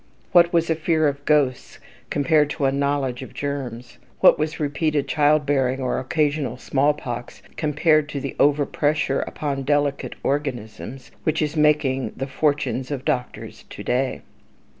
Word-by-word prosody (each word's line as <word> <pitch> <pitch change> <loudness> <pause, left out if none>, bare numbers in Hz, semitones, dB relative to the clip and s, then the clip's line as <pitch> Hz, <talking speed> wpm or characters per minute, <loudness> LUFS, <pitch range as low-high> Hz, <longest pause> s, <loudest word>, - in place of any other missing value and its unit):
What 175 -1 +6
was 165 -1 +2
a - - +2
fear 155 -1 +1
of 140 0 -3
ghosts 145 -5 +1 0.3
compared 150 0 +2
to 145 - -1
a 135 - +3
knowledge 140 -2 -1
of 130 - -10
germs? 130 -4 -5 0.2
What - - +6
was 155 +1 -2
repeated 150 0 0
child 150 0 +3
bearing, 135 -2 +1
or 130 -2 -1
occasional 145 +1 -1
smallpox, 135 -3 -2
compared 155 0 +2
to 145 - -4
the 135 -1 -5
"over 145 0 +4
pressure" 150 -2 0
upon 140 -2 -3
"delicate 145 0 0
organisms," 130 -2 -4
which 155 0 0
is 150 0 -1
making 150 -4 +2
the 135 - -2
fortunes 140 -2 -1
of 140 -3 -4
doctors 125 0 -3
to - - -8
day? 130 +1 -1
145 Hz, 150 wpm, -23 LUFS, 135-150 Hz, 0.3 s, What